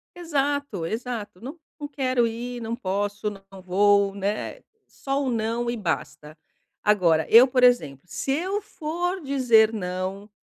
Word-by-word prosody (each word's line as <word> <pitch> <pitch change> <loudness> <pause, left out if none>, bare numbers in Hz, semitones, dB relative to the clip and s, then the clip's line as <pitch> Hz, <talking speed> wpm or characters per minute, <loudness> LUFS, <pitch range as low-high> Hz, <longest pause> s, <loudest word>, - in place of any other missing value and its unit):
Exato, 285 - -2
exato. 220 -1 -5
"Não 275 +8 -8 0.2
não 290 - -5
quero 255 -4 +1
ir, 240 +1 -5
não 225 +1 -3
posso, 205 -1 -2
não 195 -1 -13
vou", 200 +2 +3
né, 205 - -3 0.3
só 275 +1 -3
o 265 - -1
"não" 230 +1 -1
e 240 - -1
basta. 160 -4 -4 0.5
Agora 175 -7 +3
eu, 240 +3 +8
por 255 -1 +1
exemplo, 160 - +3
se 270 - -3
eu 375 +8 -1
for 355 +1 -3
dizer 245 -6 +4
"não", 185 +1 -4
230 Hz, 145 wpm, -24 LUFS, 195-270 Hz, 0.5 s, eu